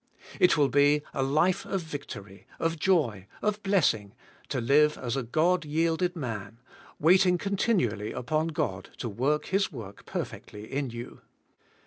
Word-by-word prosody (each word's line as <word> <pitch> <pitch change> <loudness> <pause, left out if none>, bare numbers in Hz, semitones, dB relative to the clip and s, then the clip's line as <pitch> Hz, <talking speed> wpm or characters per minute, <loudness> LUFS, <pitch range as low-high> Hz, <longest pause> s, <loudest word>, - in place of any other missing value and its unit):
It 180 -4 +5
will 145 -2 +4
be 145 +1 +4
a 135 - -1
life 155 +7 +2
of 195 -2 -2
victory, 110 -10 -8
of 165 -1 -1
joy, 130 - +1 0.2
of 210 0 0
blessing, 135 - +1 0.3
to 135 - -1
live 150 +5 +4
as 125 0 -3
a 135 - 0
God 165 +9 +2
yielded 165 +4 0
man, 115 - -5 0.4
waiting 180 +3 +5
continually 185 - 0
upon 155 +6 -1
God 155 -2 -3
to 120 - -4
work 135 +8 0
His 195 +2 +1
work 105 -8 -10
perfectly 105 +1 -6
in 140 -1 -1
you. 120 +1 -8
150 Hz, 145 wpm, -28 LUFS, 120-175 Hz, 0.4 s, It